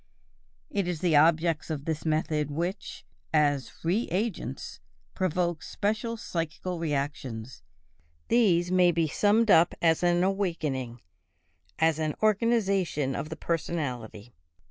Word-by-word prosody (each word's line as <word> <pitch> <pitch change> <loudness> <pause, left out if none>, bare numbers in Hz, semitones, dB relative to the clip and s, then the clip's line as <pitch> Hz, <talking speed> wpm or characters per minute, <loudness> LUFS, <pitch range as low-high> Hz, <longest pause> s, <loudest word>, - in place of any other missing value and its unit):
It 200 -9 -1
is 175 -3 -3
the 170 -4 +2
objects 160 +1 +3
of 150 -3 -4
the 160 - 0
method 155 -1 0
which, 175 +7 -4 0.3
as 145 -5 +2
"re 185 +8 +1
agents," 205 +5 -3 0.3
provoke 175 -3 -1
special 220 +3 -2
psychical 170 -1 -4
reactions; 140 -6 -4 0.7
these 180 -7 +3
may 180 -1 +5
be 165 -1 +1
summed 210 +7 +3
up 165 0 +5
as 165 -1 +3
an 175 0 +3
awakening, 155 - -2 0.8
as 160 -1 +2
an 155 -1 -1
organization 200 - +1
of 150 +2 -4
the 160 - -5
personality. 125 -10 -4
165 Hz, 120 wpm, -28 LUFS, 150-185 Hz, 0.8 s, may